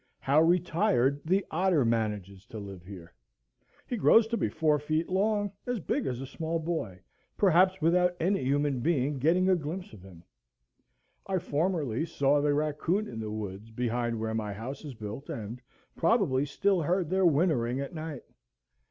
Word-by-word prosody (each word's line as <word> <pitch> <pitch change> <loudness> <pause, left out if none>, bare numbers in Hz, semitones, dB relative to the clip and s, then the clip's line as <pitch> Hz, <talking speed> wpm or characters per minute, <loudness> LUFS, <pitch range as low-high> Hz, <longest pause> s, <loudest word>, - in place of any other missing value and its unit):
How 140 +3 +3
retired 165 - +2
the 190 +4 +1
otter 170 -5 +2
manages 105 -3 -2
to 115 - -9
live 100 -4 -8
here! 90 -4 -11 0.7
He 245 - -3
grows 225 +1 +6
to 235 - 0
be - - 0
four 155 -2 +1
feet 155 +3 -1
long, 205 +2 +1 0.2
as 245 -2 -1
big 160 - -2
as 125 -2 -3
a 135 - -5
small 160 +4 -3
boy, 160 - -4 0.4
perhaps 185 0 +4
without 180 +2 +3
any 185 -2 +1
human 140 0 +1
being 140 -1 0
getting 175 +7 +3
a 190 - +5
glimpse 175 +5 -5
of 95 - -12
him. 90 -3 -14 1.0
I 190 -1 0
formerly 160 -5 -1
saw 145 -2 +2
the 145 0 +2
raccoon 155 +7 0
in 115 - -7
the 110 -1 -4
woods 105 0 -6
behind 120 0 -2
where 110 0 -2
my 105 -2 -2
house 125 +8 -7
is 145 -4 -8
built, 110 +5 -7
and 115 +2 -6 0.3
probably 165 - +2
still 190 +5 +1
heard 175 +1 0
their 190 -1 +4
whinnering 140 -6 +1
at 140 +3 -5
night. 155 -4 -6
150 Hz, 170 wpm, -29 LUFS, 115-180 Hz, 1.0 s, grows